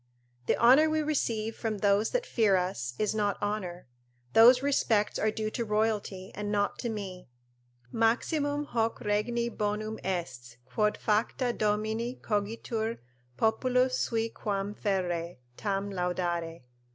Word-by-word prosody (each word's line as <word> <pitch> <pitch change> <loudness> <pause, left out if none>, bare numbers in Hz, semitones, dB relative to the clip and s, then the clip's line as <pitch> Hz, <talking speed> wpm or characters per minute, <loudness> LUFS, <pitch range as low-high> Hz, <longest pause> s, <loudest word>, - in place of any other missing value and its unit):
The - - +2
honour 265 +7 +6
we 310 0 +1
receive 225 -7 -1
from 220 -2 -3
those 200 +2 +2
that - - -1
fear 215 - +3
us 180 -10 -2
is 215 0 0
not 205 -2 0
honour; 195 -4 -3 0.5
those 245 +3 +7
respects 225 -7 +1
are 215 - +2
due 215 0 -3
to 235 - -2
royalty 210 -3 -1
and 205 0 -4
not 205 -1 0
to 240 - -2
me: 190 - -6 0.6
"Maximum 285 - +1
hoc 230 -4 -1
regni 230 +3 0
bonum 215 -1 -3
est 130 -10 -4
Quod 210 +12 0
facta 235 +3 0
domini 220 +3 -1
cogitur 220 +1 -2 0.4
populus 250 +3 +2
sui 225 -1 0
Quam 200 -2 -3
ferre, 175 -4 -2 0.2
tam 200 - -2
laudare." 175 -3 -2
215 Hz, 130 wpm, -29 LUFS, 195-230 Hz, 0.6 s, those